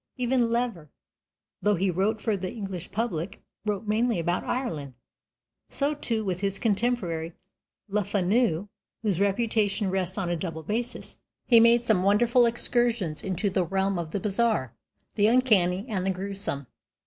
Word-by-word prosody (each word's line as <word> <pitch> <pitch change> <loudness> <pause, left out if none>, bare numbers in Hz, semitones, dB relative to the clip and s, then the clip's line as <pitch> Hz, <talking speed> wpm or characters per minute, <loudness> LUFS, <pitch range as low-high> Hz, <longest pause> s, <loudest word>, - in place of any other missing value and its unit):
Even 245 -1 +1
Lever, 230 -10 -2 0.7
though 210 0 +3
he 190 +1 +1
wrote 200 +5 0
for 220 - 0
the 185 -1 -4
English 195 -6 -6
public, 200 -4 -3 0.2
wrote 210 0 -1
mainly 225 +2 +1
about 175 +1 -1
Ireland. 155 - -3 0.7
So, 285 +2 +1
too, 230 -7 -2
with 185 -2 -2
his 195 0 0
contemporary 195 -7 -1 0.5
Le 210 +1 0
Fanu, 200 -1 +1 0.4
whose 200 -5 0
reputation 205 -1 +1
rests 185 0 -1
on 180 -3 -1
a - - +1
double 165 -2 -5
basis. 235 +8 -4 0.3
He 235 -2 +6
made 235 +1 +5
some 220 -6 +3
wonderful 235 +5 +4
excursions 235 -7 +1
into 190 +2 -1
the 185 -1 +1
realm 190 +1 0
of 165 -2 -4
the 200 - -2
bizarre, 210 - 0 0.4
the 210 -1 +3
uncanny, 210 -6 +3
and 195 -6 -2
the 190 - 0
gruesome. 190 -6 -2
200 Hz, 150 wpm, -27 LUFS, 180-230 Hz, 0.7 s, He